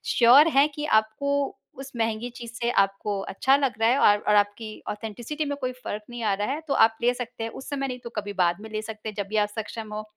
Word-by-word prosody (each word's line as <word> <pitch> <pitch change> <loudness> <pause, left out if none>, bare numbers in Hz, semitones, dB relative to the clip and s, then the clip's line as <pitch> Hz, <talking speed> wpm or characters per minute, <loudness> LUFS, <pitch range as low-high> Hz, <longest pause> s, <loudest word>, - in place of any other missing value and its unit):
Sure 255 +6 +7
हैं 285 +2 +6
कि 295 - -3 0.2
आपको 280 +6 -2 0.2
उस 270 0 -8
महँगी 225 +1 -1
चीज़ 235 -1 -9
से 235 +1 -2
आपको 195 +1 0
अच्छा 265 +7 +3
लग 275 -3 0
रहा 225 0 +4
है 255 - +3
और 205 -5 +6
और 210 - +5
आपकी 205 +2 +1 0.2
ऑथेंटिसिटी 230 +8 -4
में 285 0 -2
कोई 255 - -1
फ़र्क़ 210 +1 -4
नहीं 240 0 -7
आ 210 -2 +2
रहा 205 +2 -2
है, 295 +3 -3
तो 280 - 0
आप 225 -3 +4
ले 245 +1 +3
सकते 245 -2 -6
हैं। 225 - -4
उस 265 - -9
समय 275 -2 -2
नहीं 250 -1 -5
तो 235 - -6
कभी 205 -1 -4
बाद 175 +1 +1
में 220 - -9
ले 215 0 -2
सकते, 215 0 -7
जब 200 -1 -4
भी 215 - -5
आप 210 -1 +2
सक्षम 220 0 -5
हो। 215 0 -4
225 Hz, 255 wpm, -25 LUFS, 210-255 Hz, 0.2 s, Sure